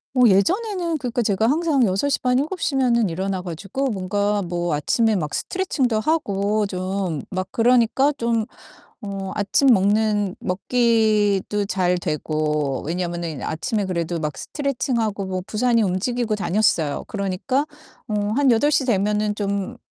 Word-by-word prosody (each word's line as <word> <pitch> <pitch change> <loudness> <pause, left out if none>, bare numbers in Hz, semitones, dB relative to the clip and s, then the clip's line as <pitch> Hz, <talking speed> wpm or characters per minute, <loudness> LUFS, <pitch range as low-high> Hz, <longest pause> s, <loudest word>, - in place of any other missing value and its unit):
뭐 250 -3 +6
예전에는 345 - +1
그러니까 245 -1 -1
제가 210 +3 +1
항상 305 -3 +2
6:30, 250 +5 +1
7:00 310 0 -1
면은 235 -5 +2
일어나 190 +2 -2
가지고 195 - -3
뭔가 205 +1 -1
뭐 175 -2 -2
아침에 220 +9 +1
막 150 -6 -3
스트레칭도 270 -12 -1
하고 210 -7 0
좀 185 -4 -3
막 185 0 -2
그러니까 245 +4 +3
좀 230 -2 0 0.6
어 195 -2 -5
아침 205 +7 +2
먹는 205 -2 +3
먹기도 210 -1 +1
잘 185 -2 +1
되고 150 -4 -1
왜냐면은 170 -4 -3
아침에 205 +5 -2
그래도 170 -2 -2
막 150 -3 -3
스트레칭하고 240 - -2
뭐 185 -1 -3
부산히 230 0 +2
움직이고 220 +5 -1
다녔어요. 190 -7 +1
그러니까 205 +8 -1 0.4
어 210 -1 -1
한 280 0 +3
8:00 280 +5 +3
되면은 210 -2 +1
좀 200 +3 -3
210 Hz, 275 characters per minute, -22 LUFS, 185-245 Hz, 0.6 s, 뭐